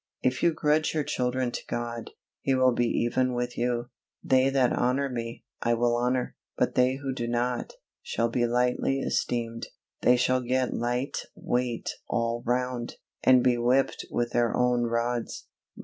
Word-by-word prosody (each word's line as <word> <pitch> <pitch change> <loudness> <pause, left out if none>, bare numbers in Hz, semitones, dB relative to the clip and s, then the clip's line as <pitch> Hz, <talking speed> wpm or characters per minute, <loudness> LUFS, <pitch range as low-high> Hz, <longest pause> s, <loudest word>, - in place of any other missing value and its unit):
If 130 0 +1
you 170 - +4
grudge 155 0 +1
your 155 - +1
children 125 -1 -1
to - - -4
God, 120 -1 -4 0.3
He 135 - +1
will 130 0 +4
be 120 0 +1
even 125 +2 +1
with 120 0 -2
you. 120 +1 -1 0.3
"They 130 0 +4
that 135 -2 +2
honor 130 +3 +1
Me, 115 -2 -5 0.2
I 120 0 +2
will 120 0 +2
honor, 125 +1 0 0.2
but - - +1
they 125 +1 +3
who 135 -1 -4
do 120 -2 -3
not, 120 +1 -1 0.3
shall 115 - -1
be 120 +1 +1
lightly 125 +3 +1
esteemed." 115 -3 -2 0.3
They 125 - +5
shall 130 +1 +2
get 125 +1 0
light 125 +3 -1 0.2
weight 120 -1 -1 0.2
all 115 0 0
round, 125 -1 -1 0.3
and 130 -1 +6
be 120 -1 +3
whipped 125 +3 +1
with 120 0 -1
their 120 -2 +1
own 125 -1 +2
rods. 120 0 -2
125 Hz, 165 wpm, -27 LUFS, 120-130 Hz, 0.3 s, and